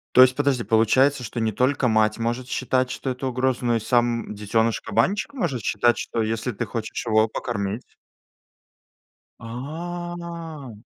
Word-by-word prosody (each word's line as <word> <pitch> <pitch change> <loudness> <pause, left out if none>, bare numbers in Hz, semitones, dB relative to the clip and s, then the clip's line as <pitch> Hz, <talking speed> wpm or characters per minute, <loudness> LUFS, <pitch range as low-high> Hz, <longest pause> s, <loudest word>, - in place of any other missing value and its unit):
То - - +8
есть 130 0 +7
подожди, 140 -4 +1
получается, 125 +5 +3
что 115 +2 -4
не 110 -1 0
только 130 +2 +2
мать 110 0 +2
может 120 +2 -2
считать, 130 -1 0
что 135 - -4
это 130 +1 -4
угроза, 130 0 0
но 120 -1 +2
и - - 0
сам 120 -1 +1
детёныш-кабанчик 115 - 0
может 170 - -2
считать, 120 -1 +2
что 115 - -3
если 115 +3 -2
ты 115 +3 -3
хочешь 110 +2 -4
его 110 0 +4
покормить 105 -1 -3 1.6
А. 165 0 -6
120 Hz, 140 wpm, -24 LUFS, 115-135 Hz, 1.6 s, То